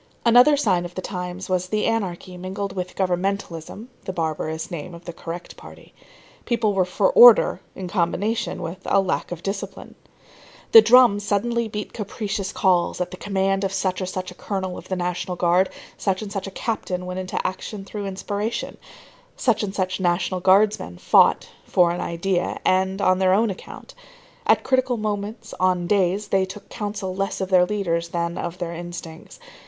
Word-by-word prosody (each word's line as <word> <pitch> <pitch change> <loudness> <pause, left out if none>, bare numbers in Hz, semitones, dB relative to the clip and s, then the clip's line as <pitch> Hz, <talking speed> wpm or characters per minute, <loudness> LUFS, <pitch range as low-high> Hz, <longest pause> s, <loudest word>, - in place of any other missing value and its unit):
Another 245 +5 +6
sign 190 -10 +2
of 175 0 -8
the 185 - -3
times 180 -1 -5
was 185 -1 0
the 210 +2 0
anarchy 190 -5 -2
mingled 190 +2 -5
with 180 -1 -4
governmentalism 190 +1 -2 0.2
[the - - -3
barbarous 160 -1 -3
name 170 +1 -6
of 170 - -14
the 175 - -6
correct 170 +1 -7
party]. - - -14 0.5
People 225 -3 +1
were 190 -2 +2
for 190 +2 +1
order 240 -3 +7
in 185 - -6
combination 195 +5 -1
with 165 +3 -6
lack 195 -2 +1
of 175 -1 -6
discipline. 195 0 -5 0.8
The 450 - +11
drum 245 - +6
suddenly 225 +3 0
beat 210 -1 -6
capricious 205 -2 -4
calls, 180 -3 +1
at 180 0 -2
the - - -6
command 195 0 0
of 195 - 0
such 190 -1 -1
or 185 - -2
such 185 0 -4
a - - -10
Colonel 190 -1 -4
of - - -10
the 190 - -2
National 180 0 -2
Guard; 180 +2 +3 0.3
such 195 +1 -1
and 205 - -7
such 195 -2 -4
a 195 - -8
captain 185 -5 -3
went 180 +1 -4
into 185 0 -3
action 195 +2 -4
through 205 0 -5
inspiration; 205 +4 -3 0.6
such 235 -4 +2
and 205 -2 -3
such 185 0 -1
National 180 +1 0
Guardsmen 190 - +3
fought, - - +4 0.2
"for 175 -2 +4
an 175 - -3
idea," 175 +1 -1
and 190 +1 +1
on 185 0 +3
their 190 0 +4
own 220 +1 +2
account. 190 - -10 0.5
At - - +4
critical 260 -2 +1
moments, 215 +1 -4
on 185 -1 +2
"days" 195 +1 +1
they 190 -1 +2
took 200 +2 -11
counsel 205 -3 -4
less 195 +1 -2
of 190 -1 -2
their 180 -1 +5
leaders 170 -5 -1
than 170 0 -2
of 175 +1 -4
their 175 -2 -4
instincts. 170 - -9
190 Hz, 175 wpm, -23 LUFS, 180-205 Hz, 0.8 s, The